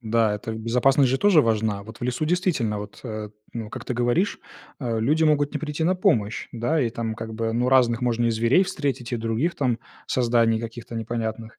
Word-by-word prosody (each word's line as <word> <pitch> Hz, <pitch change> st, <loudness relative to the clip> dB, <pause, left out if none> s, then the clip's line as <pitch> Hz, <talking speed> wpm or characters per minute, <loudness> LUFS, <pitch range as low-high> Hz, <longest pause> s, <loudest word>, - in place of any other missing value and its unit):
Да, 110 Hz, -2 st, +1 dB
безопасность 120 Hz, +4 st, +2 dB
же 135 Hz, -, +1 dB
тоже 195 Hz, -7 st, +5 dB
важна. 110 Hz, -2 st, 0 dB
Вот 110 Hz, +3 st, -11 dB
в -, -, -10 dB
лесу 125 Hz, +4 st, -1 dB
действительно, 155 Hz, -, 0 dB
вот, 105 Hz, -, -9 dB
э, 110 Hz, -2 st, -5 dB, 0.2 s
ну 110 Hz, -2 st, -6 dB
как -, -, -7 dB
ты 125 Hz, -, -3 dB
говоришь, 120 Hz, -, +1 dB, 0.4 s
а, 115 Hz, -5 st, -2 dB
люди 150 Hz, +8 st, +2 dB
могут 145 Hz, -2 st, +2 dB
не 150 Hz, -, -2 dB
прийти 150 Hz, +1 st, -3 dB
на 185 Hz, -, +3 dB
помощь, 110 Hz, -, +1 dB
да, 125 Hz, +7 st, 0 dB
и 120 Hz, -3 st, +1 dB
там 115 Hz, -1 st, -3 dB
как 110 Hz, 0 st, -7 dB
бы 115 Hz, 0 st, -1 dB
ну 125 Hz, +2 st, +1 dB
разных 120 Hz, -3 st, +4 dB
можно 120 Hz, -1 st, +1 dB
и -, -, +2 dB
зверей 115 Hz, -, +3 dB
встретить, 140 Hz, -9 st, -3 dB
и -, -, +1 dB
других 115 Hz, +9 st, -1 dB
там 125 Hz, -5 st, 0 dB, 0.3 s
созданий 115 Hz, -2 st, +2 dB
каких-то 115 Hz, 0 st, -8 dB
непонятных. 115 Hz, 0 st, -4 dB
120 Hz, 200 wpm, -24 LUFS, 110-135 Hz, 0.4 s, тоже